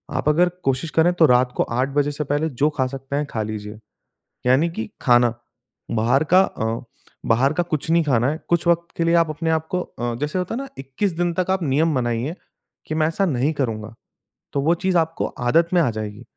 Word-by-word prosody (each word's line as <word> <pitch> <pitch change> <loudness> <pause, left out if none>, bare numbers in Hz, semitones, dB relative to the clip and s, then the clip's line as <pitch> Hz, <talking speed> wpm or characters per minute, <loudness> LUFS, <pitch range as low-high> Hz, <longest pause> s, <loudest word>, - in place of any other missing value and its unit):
आप 130 +3 +1
अगर 175 +4 +4
कोशिश 135 +4 0
करें 175 +2 +5
तो 170 -2 +5
रात 125 0 +3
को - - +3
8 135 +4 -1
से 145 +1 -3
पहले 145 +3 -1
जो 140 +3 +1
खा 130 - +2
सकते 135 +1 -6
हैं 145 +1 0
खा 110 - -2
लीजिए। 105 0 -6 0.7
यानि 135 +7 +3
की 110 -10 -5
खाना, 120 -2 +4 0.6
बाहर 120 +6 +2
का 185 - +8
अ, 115 -9 -3 0.4
बाहर 130 +6 +3
का 175 - 0
कुछ 160 -2 -3
नहीं 170 0 +4
खाना 130 -4 +2
है। 155 - -2
कुछ 170 0 +1
वक़्त 170 0 +2
के 170 - +1
लिए 170 +1 +3
आप 165 -2 +3
अपने 160 +2 -2
आपको 160 +3 0
अ, 120 -7 -4
जैसे 150 +5 -1
होता 180 +5 -3
है 250 - -3
ना 275 - -6
21 135 +9 -2
दिन 175 -1 0
तक 185 +1 -1
आप 190 -1 0
नियम 150 +2 +1
बनाइए 120 +6 -1 0.5
कि 155 - -3
मैं 155 -1 +2
ऐसा 165 +5 0
नहीं 140 -3 +1
करूँगा। 110 -7 -3 0.6
तो 140 - 0
वो 165 +4 +3
चीज़ 185 +1 0
आपको 165 0 0
आदत 165 +8 +1
में 175 - +5
आ 150 - +2
जाएगी 110 +1 -6
145 Hz, 215 wpm, -22 LUFS, 125-165 Hz, 0.7 s, का